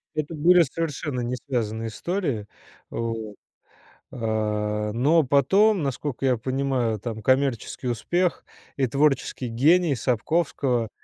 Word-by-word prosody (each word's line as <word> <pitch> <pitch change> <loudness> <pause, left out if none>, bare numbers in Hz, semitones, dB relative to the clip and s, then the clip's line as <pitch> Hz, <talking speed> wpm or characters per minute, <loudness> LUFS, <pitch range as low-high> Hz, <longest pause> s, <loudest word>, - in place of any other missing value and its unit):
Это 155 +1 -3
были 175 +4 +5
совершенно 145 -3 -3
не 120 +1 -2
связанные 115 -4 -3
истории, 135 - -3 0.4
вот, 115 -2 -4 0.8
а. 105 -2 -1
Но 150 +8 +3
потом, 190 - +3
насколько 135 0 -3
я 125 -2 +3
понимаю, 130 -2 -1
там 110 0 -6
коммерческий 130 -1 0
успех 175 +9 0 0.3
и 135 -2 +2
творческий 135 -1 +1
гений 150 +6 +3
Сапковского, 125 -1 0
130 Hz, 110 wpm, -24 LUFS, 115-150 Hz, 0.8 s, были